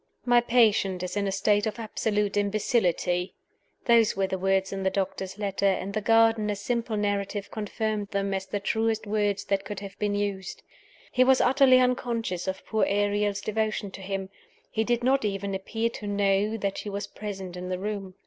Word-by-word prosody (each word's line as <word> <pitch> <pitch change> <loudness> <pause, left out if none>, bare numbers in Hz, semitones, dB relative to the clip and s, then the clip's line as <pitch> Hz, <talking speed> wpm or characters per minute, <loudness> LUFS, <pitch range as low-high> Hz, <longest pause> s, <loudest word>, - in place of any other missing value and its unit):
"My 245 -1 +5
patient 215 -6 +3
is 180 - -4
in 200 -1 0
a - - 0
state 205 +2 +2
of 220 - -4
absolute 210 -2 -1
imbecility" 200 -4 0 0.5
those 230 -3 +4
were 195 - +2
the 190 0 -3
words 195 +1 +1
in 195 - -3
the 190 - +2
doctor's 190 0 -3
letter; 200 -1 0
and 195 0 0
the 215 - -1
gardener's 225 -2 +3
simple 230 +1 -1
narrative 205 0 -2
confirmed 215 0 -2
them 195 0 -1
as 190 0 -3
the 205 +2 -2
truest 220 +2 0
words 205 -1 0
that 195 -1 0
could 205 -2 -6
have 200 -1 -9
been 205 -1 0
used. 200 -2 -3 0.5
He 255 - +4
was 260 0 +5
utterly 260 0 +5
unconscious 235 -7 0
of 190 0 -4
poor 220 -1 0
Ariel's 205 0 +1
devotion 215 -1 -2
to 195 - -9
him 190 0 -4 0.4
he 220 - 0
did 240 +1 0
not 265 +1 +3
even 200 -1 -2
appear 225 +4 -2
to 210 - -7
know 205 +1 +1
that 200 -2 -2
she 210 - -5
was 200 0 -3
present 195 -3 -7
in 180 0 -6
the 185 - -1
room. 195 -1 -5
205 Hz, 185 wpm, -27 LUFS, 195-220 Hz, 0.5 s, My